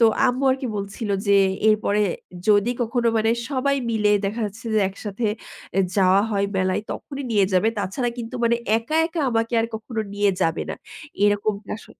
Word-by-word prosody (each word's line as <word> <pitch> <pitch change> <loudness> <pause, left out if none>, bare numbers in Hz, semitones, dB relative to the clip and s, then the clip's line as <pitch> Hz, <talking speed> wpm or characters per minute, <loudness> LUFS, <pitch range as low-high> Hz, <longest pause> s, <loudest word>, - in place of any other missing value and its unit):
তো - - +7 0.2
আম্মু 255 +2 0
আর 260 - +2
কি 265 - -2
বলছিল 200 +2 -4 0.2
যে 200 - +4 0.3
এরপরে 215 -1 +2 0.5
যদি 210 +2 +4
কখনো 235 +1 0
মানে 220 0 +2 0.2
সবাই 280 0 +1
মিলে 210 -2 +2
দেখা 205 +4 -2
যাচ্ছে 220 +3 -10
যে - - +4
একসাথে 205 +3 -4 0.5
এ - - +6 0.2
যাওয়া 190 0 +5
হয় 200 -2 +1
মেলায় 185 +1 0
তখনই 280 -1 -7
নিয়ে 205 -3 +4
যাবে। 185 +4 +3
তাছাড়া 205 +6 -1
কিন্তু 230 +1 -6
মানে 235 0 +3 0.2
একা, 230 +8 -3
একা 330 0 -4
আমাকে 230 0 0
আর 225 - 0
কখনো 220 +1 -4
নিয়ে 205 0 +3
যাবে 165 0 0
না। - - -3 0.5
এরকমটা 205 0 0
আস - - -14
215 Hz, 180 wpm, -23 LUFS, 200-235 Hz, 0.5 s, তো